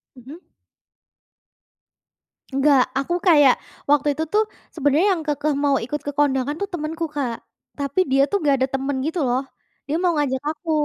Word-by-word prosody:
Mhm. 270 +8 -12 2.1
Enggak, 275 -1 +3
aku 275 +6 -1
kayak 290 -8 +6 0.3
waktu 290 0 +3
itu 320 - 0
tuh 420 +7 +2 0.3
sebenarnya 300 +4 +2
yang 330 - -5
kekeh 295 0 0
mau 285 0 +2
ikut 260 +6 -4
ke 290 - -3
kondangan 285 -1 +1
tuh 400 - -2
temenku, 320 0 -3
Kak. 275 -6 -3 0.4
Tapi 280 +4 -1
dia 270 +1 +4
tuh 405 - +1
nggak 285 -2 +4
ada 260 - +3
temen 270 +1 -1
gitu 325 +3 -2
loh, 250 +1 +1 0.5
dia 300 - 0
mau 355 - +3
ngajak 265 -3 0
aku. 320 +1 -4
290 Hz, 160 wpm, -22 LUFS, 270-315 Hz, 2.1 s, kayak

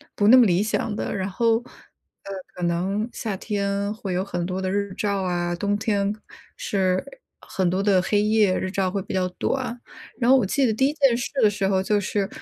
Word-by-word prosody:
不 205 - +2
那 250 +4 +9
么 245 - +7
理 180 +2 +2
想 215 0 -1
的， - - -3
然 190 0 -2
后， 225 +3 +2
呃， 235 - -8 0.9
可 180 - -6
能 185 +5 0
夏 210 -5 -4
天 200 0 -2
会 200 -4 -5
有 180 +1 0
很 175 -3 -3
多 185 +1 -3
的 185 0 -1
日 200 -1 -2
照 200 -2 -1
啊， 175 -1 -1
冬 205 +3 -1
天 205 -1 0 0.4
是 185 -2 0 0.4
很 185 -2 -1
多 185 +2 0
的 200 -2 +3
黑 205 +2 +1
夜， 210 -3 +3
日 185 - -3
照 195 -2 0
会 200 0 -2
比 - - -7
较 185 -1 +1
短。 250 -3 -2 0.4
然 240 - +2
后 265 - +8
我 245 - +2
记 265 +8 +1
得 225 - +2
第 265 +5 +2
1 295 - -1
件 275 -6 +3
事 240 - -3
的 215 - +6
时 205 -1 -1
候， 190 -1 +2
就 205 +2 +1
是 200 0 -1
200 Hz, 230 characters per minute, -24 LUFS, 185-215 Hz, 0.9 s, 那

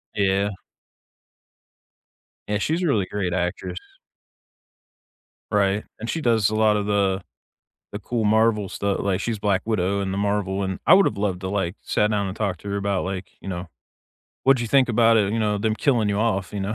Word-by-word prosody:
Yeah. 100 0 +2 2.0
Yeah, 105 0 0
she's 160 - 0
a 175 - +1
really 105 -9 +2
great 95 -3 -3
actress. 90 0 -2 1.7
Right. 100 0 +2 0.2
And 115 - -5
she 165 - -2
does 110 -5 +3
a 110 - -2
lot 110 -1 +3
of 100 - -2
the 100 -2 +1 0.7
the 100 - -5
cool 115 +1 -2
Marvel 110 -1 +3
stuff, 100 +1 -2
like, 100 0 0
she's 115 -3 -2
Black 100 -2 +1
Widow 100 -2 0
in 95 - -2
the 95 - -2
Marvel 100 -1 -1
and 95 -1 -3
I - - +7
would've 185 - +4
loved 100 -3 -1
to, 95 - -3
like, 95 -2 -1
sat 105 +1 +1
down 100 -2 0
and 95 - -5
talked 100 -5 -2
to 100 - -10
her 100 - -2
about 100 -2 -1
like, 95 -2 -5
you - - -11
know, 90 -2 -5 0.7
"What 135 0 +5
do 120 - -3
you 115 - -3
think 135 -1 +4
about 115 0 +4
it, 105 -1 +2
you 115 - 0
know, 105 -1 +1
them 110 +1 0
killing 120 -5 +1
you 100 - -1
off, 105 -4 0
you 100 - -3
know?" 100 +3 -2
100 Hz, 200 wpm, -23 LUFS, 95-110 Hz, 2.0 s, I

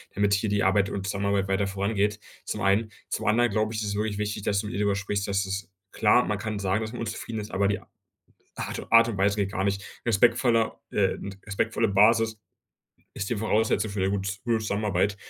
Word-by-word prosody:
damit 100 0 +2
hier 100 +2 -1
die 100 0 +1
Arbeit 95 +1 +3
und 95 -1 -4
Zusammenarbeit 100 0 0
weiter 95 +1 +1
vorangeht.“, 100 +1 0 0.3
zum 105 - -4
einen. 100 +3 +2 0.2
Zum - - -3
anderen 120 +3 +4
glaube 110 +1 0
ich, 110 - -2
ist 105 - -2
es 100 - -2
wirklich 105 0 -1
wichtig, 105 -1 -3
dass 100 -1 +1
du 105 - -3
mit - - -6
ihr - - -3
darüber 100 -1 +2
sprichst. 100 0 -2
Das 100 -1 0
ist 95 -1 -4 0.2
klar, 110 +3 +4
man 105 - -1
kann 110 -1 -3
sagen, 100 +2 0
dass 110 - -4
man 120 - -7
unzufrieden 110 0 -4
ist, 105 0 -6
aber 100 +1 +1
die 100 - 0
A - - -21 0.7
Art - - -4
u - - -9
Art 115 0 +7
und 115 - -3
Weise 100 +1 +2
geht 100 -2 0
gar 95 - -1
nicht. 100 0 0 0.2
respektvoller, 115 +1 +2
äh 95 -2 +2 0.3
respektvolle 110 +2 0
Basis, 110 +2 +4 0.8
ist 100 - -3
die 120 - 0
Voraussetzung 110 0 +1
für 100 0 -3
'ne 95 +1 +1
gut 100 -1 -2
gute 115 -1 +2
Zusammenarbeit. 100 -2 0
105 Hz, 225 wpm, -26 LUFS, 100-110 Hz, 0.8 s, Art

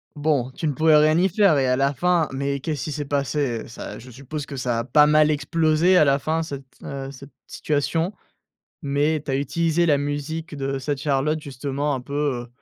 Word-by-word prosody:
Bon, 145 -4 0
tu 155 - -3
ne 145 - 0
pouvais 155 +2 +4
rien 155 +2 +4
y 190 +2 +3
faire 195 -5 +4
et 130 - +1
à 125 - +3
la 140 +2 +1
fin, 175 +1 +2
mais 140 +1 -2
qu'est-ce 150 +1 -3
qui 155 - -4
s'est 145 0 -4
passé? 140 -4 -1
Ça, 115 - -8
je 125 +2 -13
suppose 140 +4 -7
que 140 - -7
ça 120 -2 -1
a - - -1
pas 150 +5 +5
mal 150 0 +4
explosé 160 +4 +2
à 155 - +6
la 140 -1 +3
fin 155 +4 -1
cette, 140 -4 -6 0.2
heu, 135 -1 -6
cette 140 +1 -13
situation? 160 +4 -1 0.7
Mais 145 +2 +1
tu 140 - -3
as - - +1
utilisé 165 +5 +1
la 145 -3 +4
musique 145 +3 -4
de 135 -1 -2
cette 135 +1 -3
Charlotte 150 +2 0
justement, 140 +1 -3
un 130 - -5
peu, 140 +3 -10 0.3
heu, - - -18
145 Hz, 215 wpm, -23 LUFS, 135-155 Hz, 0.7 s, à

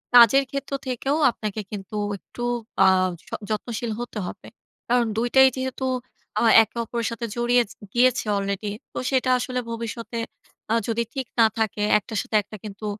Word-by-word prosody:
কাজের 245 +3 +8
ক্ষেত্র 275 0 -4 0.2
থেকেও 270 +4 0
আপনাকে 215 -2 -4
কিন্তু 205 0 -7 0.2
একটু 240 - -12 0.4
আ - - +7 0.4
য - - -28 0.2
যত্নশীল 225 +1 -3
হতে 240 -2 -6
হবে। - - -9 0.4
কারণ 245 0 +4
২ 235 +2 +1
টাই 265 0 +9
যেহেতু 260 0 -3 0.6
আ - - +2 0.2
একে 220 +2 -11
অপরের 235 0 -2
সাথে 230 0 -4
জড়িয়ে 240 +1 +3
জি - - -13 0.2
গিয়েছে 250 0 +3
অলরেডি 200 +1 -2 0.2
তো, - - -7
সেটা 260 -1 +2
আসলে 250 0 -2
ভবিষ্যতে 230 0 -5 0.5
আ - - +4
যদি 230 +1 0
ঠিক 265 -3 -3
না 225 - +8
থাকে, 215 -1 0 0.2
একটার 215 0 -4
সাথে - - -4
একটা 215 +2 -10
কিন্তু 210 +1 -7
235 Hz, 165 wpm, -24 LUFS, 215-250 Hz, 0.6 s, টাই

